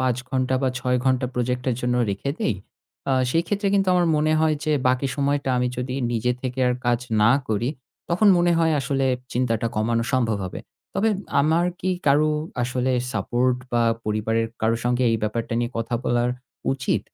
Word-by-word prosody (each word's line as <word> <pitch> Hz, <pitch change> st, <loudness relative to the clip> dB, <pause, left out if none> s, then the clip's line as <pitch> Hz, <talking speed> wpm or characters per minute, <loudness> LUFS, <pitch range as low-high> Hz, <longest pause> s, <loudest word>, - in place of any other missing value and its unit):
৫ 130 Hz, -2 st, +1 dB
ঘণ্টা 130 Hz, 0 st, 0 dB
বা 130 Hz, -, +3 dB
৬ 125 Hz, 0 st, +1 dB
ঘণ্টা 130 Hz, -1 st, +2 dB
প্রজেক্টের 125 Hz, 0 st, -1 dB
জন্য 125 Hz, 0 st, 0 dB, 0.2 s
রেখে 100 Hz, +8 st, -3 dB
দেই 115 Hz, -, +1 dB, 0.6 s
আ -, -, +3 dB, 0.2 s
সেই 165 Hz, +3 st, +2 dB
ক্ষেত্রে 200 Hz, +1 st, 0 dB
কিন্তু 195 Hz, -1 st, +2 dB
আমার 175 Hz, -1 st, +3 dB
মনে 155 Hz, +1 st, +2 dB
হয় 155 Hz, -1 st, +3 dB
যে 155 Hz, -, +1 dB, 0.2 s
বাকি 130 Hz, +2 st, +1 dB
সময়টা 140 Hz, -1 st, 0 dB
আমি 125 Hz, 0 st, +1 dB
যদি 125 Hz, +1 st, -3 dB, 0.2 s
নিজে 120 Hz, +2 st, +1 dB
থেকে 130 Hz, 0 st, -4 dB
আর 125 Hz, -, +1 dB
কাজ 120 Hz, -1 st, +2 dB, 0.2 s
না 110 Hz, -, +6 dB, 0.2 s
করি, 110 Hz, +3 st, 0 dB, 0.4 s
তখন 185 Hz, +5 st, +4 dB
মনে 175 Hz, 0 st, +3 dB
হয় 165 Hz, -1 st, +3 dB
আসলে 135 Hz, 0 st, 0 dB, 0.3 s
চিন্তাটা 115 Hz, -2 st, 0 dB
কমানো 115 Hz, +2 st, +1 dB
সম্ভব 115 Hz, -5 st, +2 dB
হবে। 90 Hz, -, -6 dB, 0.3 s
তবে 200 Hz, +3 st, +2 dB, 0.3 s
আমার 160 Hz, +4 st, +2 dB, 0.2 s
কি 185 Hz, -, 0 dB, 0.2 s
কারো 145 Hz, +2 st, +4 dB, 0.3 s
আসলে 125 Hz, +1 st, 0 dB, 0.2 s
support 125 Hz, +1 st, +1 dB, 0.2 s
বা 120 Hz, 0 st, +3 dB, 0.2 s
পরিবারের 110 Hz, +1 st, 0 dB, 0.2 s
কারো 115 Hz, +1 st, +2 dB
সঙ্গে 125 Hz, +1 st, +1 dB
এই 115 Hz, -, +2 dB
ব্যাপারটা 115 Hz, +2 st, -2 dB
নিয়ে 120 Hz, 0 st, -1 dB
কথা 115 Hz, +1 st, -2 dB
বলার 120 Hz, 0 st, +1 dB, 0.4 s
উচিত? 135 Hz, -1 st, 0 dB
125 Hz, 180 wpm, -23 LUFS, 120-140 Hz, 0.6 s, না